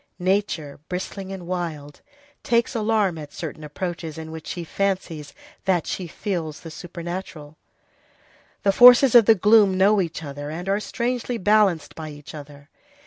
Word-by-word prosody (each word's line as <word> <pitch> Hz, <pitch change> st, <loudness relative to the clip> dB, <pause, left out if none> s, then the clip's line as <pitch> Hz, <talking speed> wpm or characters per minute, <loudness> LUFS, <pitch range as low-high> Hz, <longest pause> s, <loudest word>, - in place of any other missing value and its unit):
Nature, 180 Hz, -6 st, -1 dB
bristling 190 Hz, +1 st, -5 dB
and 190 Hz, -2 st, -7 dB
wild, 165 Hz, -5 st, -5 dB, 0.4 s
takes 235 Hz, -1 st, +1 dB
alarm 210 Hz, -6 st, +1 dB
at 150 Hz, -1 st, -9 dB
certain 155 Hz, -1 st, -7 dB
approaches 165 Hz, +1 st, -5 dB
in 160 Hz, 0 st, -7 dB
which 160 Hz, -1 st, -9 dB
she 175 Hz, -, -4 dB
fancies 170 Hz, -5 st, -2 dB, 0.3 s
that 180 Hz, -4 st, +1 dB
she 180 Hz, -, -4 dB
feels 165 Hz, -4 st, -4 dB
the 165 Hz, -, -9 dB
supernatural. 170 Hz, -3 st, -7 dB, 1.1 s
The 200 Hz, -, +4 dB
forces 245 Hz, +4 st, +8 dB
of 235 Hz, -3 st, +8 dB
the 225 Hz, -, +6 dB
gloom 205 Hz, -1 st, +5 dB
know 200 Hz, +2 st, +4 dB
each 165 Hz, -2 st, -4 dB
other, 145 Hz, 0 st, -6 dB
and 170 Hz, +4 st, -6 dB
are 200 Hz, +1 st, +1 dB
strangely 245 Hz, +2 st, -2 dB
balanced 205 Hz, -5 st, +2 dB
by 155 Hz, -1 st, -7 dB
each 145 Hz, +1 st, -11 dB
other. 145 Hz, -1 st, -11 dB
180 Hz, 150 wpm, -23 LUFS, 155-200 Hz, 1.1 s, forces